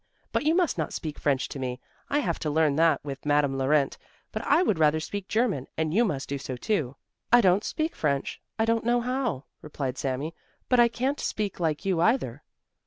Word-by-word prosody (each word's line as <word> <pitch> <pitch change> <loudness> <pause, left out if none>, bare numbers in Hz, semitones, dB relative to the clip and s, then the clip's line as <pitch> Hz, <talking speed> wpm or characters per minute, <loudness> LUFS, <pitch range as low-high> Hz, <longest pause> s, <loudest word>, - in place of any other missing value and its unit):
But - - 0
you 315 +2 +4
must 360 -2 +1
not - - -2
speak 155 -3 -5
French 135 -2 +1
to 140 - -6
me. 125 -1 -3 0.3
I 285 - +1
have 170 - -2
to 155 - -2
learn 150 -1 +2
that 160 -3 +3
with 135 -2 -6
Madame 145 -2 +2
Laurent, 135 +1 +1 0.3
but 215 - -3
I 310 +6 +5
would 205 - +1
rather 155 0 +4
speak 195 +4 -5
German, 215 - 0
and 160 -1 0
you 225 +5 +4
must 145 -9 -2
do 140 0 -3
so 130 -1 -5
too." 140 - -1 0.4
"I 240 - +8
don't 195 -1 +4
speak 315 +1 -2
French, 140 -3 -1 0.2
I 220 - +2
don't 230 0 +1
know 240 +1 +2
how," 245 - -1 0.2
replied 135 -4 -4
Sami; 140 +4 -2 0.4
"but 250 - +4
I 240 - +7
can't 260 +5 -1
speak 205 -3 -2
like 160 -2 -1
you 185 -4 +1
either." 230 +8 +1
160 Hz, 210 wpm, -27 LUFS, 140-230 Hz, 0.4 s, I